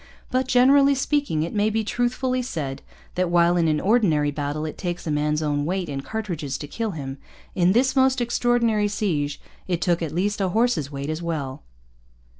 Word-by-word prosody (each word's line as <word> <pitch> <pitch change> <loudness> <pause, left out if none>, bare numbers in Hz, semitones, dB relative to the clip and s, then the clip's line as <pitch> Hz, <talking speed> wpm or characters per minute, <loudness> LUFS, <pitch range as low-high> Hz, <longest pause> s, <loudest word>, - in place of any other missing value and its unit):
But, 255 0 +1
generally 275 +3 +5
speaking, 275 - 0
it 165 - -4
may 210 0 +2
be 220 +1 0
truthfully 250 +3 -1
said 150 - -4 0.3
that 180 -1 0
while, 175 0 +4
in 170 -2 +2
an 155 -1 +2
ordinary 175 -9 +2
battle, 145 +1 -3
it 155 - -5
takes 175 -1 -4
a 160 - -2
man's 150 +1 0
own 145 -1 0
weight 180 +1 -2
in 135 -1 -3
cartridges 170 -7 -4
to 145 - -7
kill 225 +8 -3
him, 135 -1 -6 0.3
in 180 0 +3
this 255 +4 +2
most 260 -1 +3
extraordinary 235 -3 +1
siege 165 -9 -1 0.3
it 175 -3 0
took 175 -2 +1
at 160 -3 -2
least 200 +5 -1
a 190 - +1
horse's 185 - +1
weight 140 +2 -4
as 155 +2 -4
well. 145 -6 -4
175 Hz, 190 wpm, -23 LUFS, 150-235 Hz, 0.3 s, generally